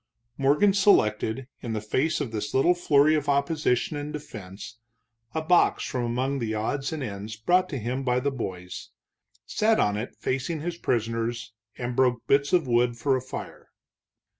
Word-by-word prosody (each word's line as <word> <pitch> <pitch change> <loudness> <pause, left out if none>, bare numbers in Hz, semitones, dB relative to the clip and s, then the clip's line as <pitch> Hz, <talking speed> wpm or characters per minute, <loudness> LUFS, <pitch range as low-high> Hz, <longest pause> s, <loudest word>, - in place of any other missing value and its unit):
Morgan 145 +10 +3
selected, 130 - +3
in 115 - -5
the 110 - -1
face 130 +9 0
of 140 -6 -3
this 105 -2 -4
little 150 +7 +5
flurry 155 -3 +4
of 150 -2 0
opposition 140 -1 +1
and 145 +1 -5
defense, 110 -7 -9 0.6
a 160 - -1
box 175 +2 +3
from 125 -2 -2
among 130 +4 -1
the 110 -2 -2
odds 135 +6 -2
and 155 -3 -4
ends 105 -1 -6
brought 180 +12 +2
him 130 -1 -3
by 125 -1 +1
the 140 +2 -1
boys, 90 -8 -6 0.6
sat 220 +1 +2
on 105 0 +2
it 110 +4 -5
facing 135 +5 -2
his 175 +1 -3
prisoners 115 0 -2 0.2
and 120 0 -3
broke 125 -2 +2
bits 140 +1 +2
of 175 -4 +3
wood 120 -1 +2
for 135 +3 +1
a 130 - -1
fire. 130 - -8
130 Hz, 165 wpm, -26 LUFS, 115-150 Hz, 0.6 s, little